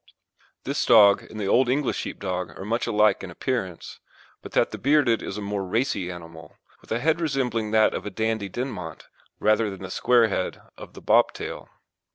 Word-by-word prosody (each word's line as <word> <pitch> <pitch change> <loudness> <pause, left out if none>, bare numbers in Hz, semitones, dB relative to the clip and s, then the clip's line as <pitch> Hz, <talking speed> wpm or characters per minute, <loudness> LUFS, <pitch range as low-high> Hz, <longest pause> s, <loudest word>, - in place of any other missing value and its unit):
This 140 +3 -1
dog 105 -4 +6
and 110 - -8
the 105 - -2
Old 125 +5 +3
English 135 0 0
Sheepdog 90 -1 -4
are 95 - -7
much 115 +3 -1
alike 105 -3 +3
in 95 - -6
appearance, 95 -2 -4 0.4
but - - -11
that - - +2
the - - -7
bearded 135 -4 +3
is 100 - -5
a 105 - -5
more 100 -1 -3
racy 95 -2 -1
animal, 85 -3 -11 0.2
with - - -20
a 115 - +1
head 160 +6 +1
resembling 125 -8 -1
that 110 0 +3
of - - -3
the 105 - -4
Dandie 110 0 -2
Dinmont 100 - -6 0.3
rather 110 +1 +2
than 95 -1 -8
the 95 - -7
square 120 -2 +3
head 95 -3 -3 0.2
of - - -12
the - - -10
Bobtail. - - +1
110 Hz, 190 wpm, -25 LUFS, 95-125 Hz, 0.4 s, dog